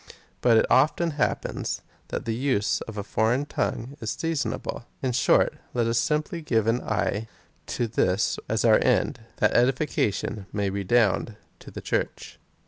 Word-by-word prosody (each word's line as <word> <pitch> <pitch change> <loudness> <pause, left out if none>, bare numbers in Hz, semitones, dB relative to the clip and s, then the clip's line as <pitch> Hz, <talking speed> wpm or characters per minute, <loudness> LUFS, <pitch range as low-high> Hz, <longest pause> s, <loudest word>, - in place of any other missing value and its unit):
But 115 -2 +5
it - - +4
often 155 +5 +3
happens, 145 - -2 0.2
that - - -4
the 115 - -1
use 115 -5 0
of 110 -1 -8
a 100 - -2
foreign 115 +6 +1
tongue 135 -1 -3
is 110 - -3
season 165 0 -1
able. 120 - -6 0.2
In 130 - +1
short, 125 - +3 0.2
let 120 -1 +2
us 115 +1 +2
simply 150 - -1
have 110 -3 +3
an 115 +2 +1
eye 105 +1 -1 0.4
to 120 - -1
this 105 -3 +1
as 110 +1 +1
our 110 -2 +6
end 125 +1 +2
— - - -32
that - - +3
edification 120 -6 +1
may 100 -2 -1
redound 105 +2 +1 0.2
to - - -12
the - - -8
Church. - - -3
115 Hz, 165 wpm, -26 LUFS, 110-130 Hz, 0.4 s, our